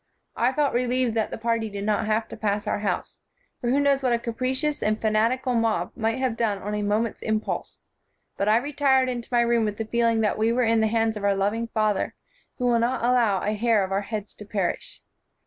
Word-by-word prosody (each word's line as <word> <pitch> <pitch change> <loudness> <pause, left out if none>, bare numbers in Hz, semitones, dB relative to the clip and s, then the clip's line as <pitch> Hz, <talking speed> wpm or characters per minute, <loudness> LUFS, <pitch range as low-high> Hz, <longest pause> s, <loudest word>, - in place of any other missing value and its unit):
I 240 +2 +2
felt 290 0 +1
relieved 250 -1 +1
that 220 -1 0
the - - -5
party 230 -1 -1
did 200 -1 -5
not 215 +1 0
have 220 +1 0
to - - -7
pass 205 0 -1
our 210 - -1
house, 205 -1 -3 0.4
for 240 - -2
who 270 +3 +3
knows 280 -1 +3
what 255 -2 +1
a - - +3
capricious 260 +6 -2
and 215 +1 0
fanatical 230 +4 +1
mob 225 -6 0
might 225 +1 -1
have 260 -3 -1
done 220 -4 0
on 205 +2 -5
a 210 - -1
mo 205 +1 +1
ment's 230 -2 -4
impulse? 220 0 -3 0.5
But 200 - 0
I 215 - +5
retired 265 -1 +2
into 240 -2 -5
my 240 -1 +4
room 235 -1 +2
with 210 -1 -2
the 225 - -3
feeling 230 0 +1
that 215 0 0
we 220 +1 +2
were 250 +1 +2
in 225 0 +3
the 220 - +3
hands 225 0 +1
of 205 - -7
our 200 -1 +2
loving 205 +4 0
Father, 215 -3 0 0.4
who 250 - -2
will 240 -1 +3
not 235 +1 0
allow 235 -6 +2
a 210 - 0
hair 220 -1 +2
of 190 - -4
our 195 +1 +1
heads 210 0 -5
to - - -8
perish. 195 -4 -3
225 Hz, 235 wpm, -25 LUFS, 215-245 Hz, 0.5 s, I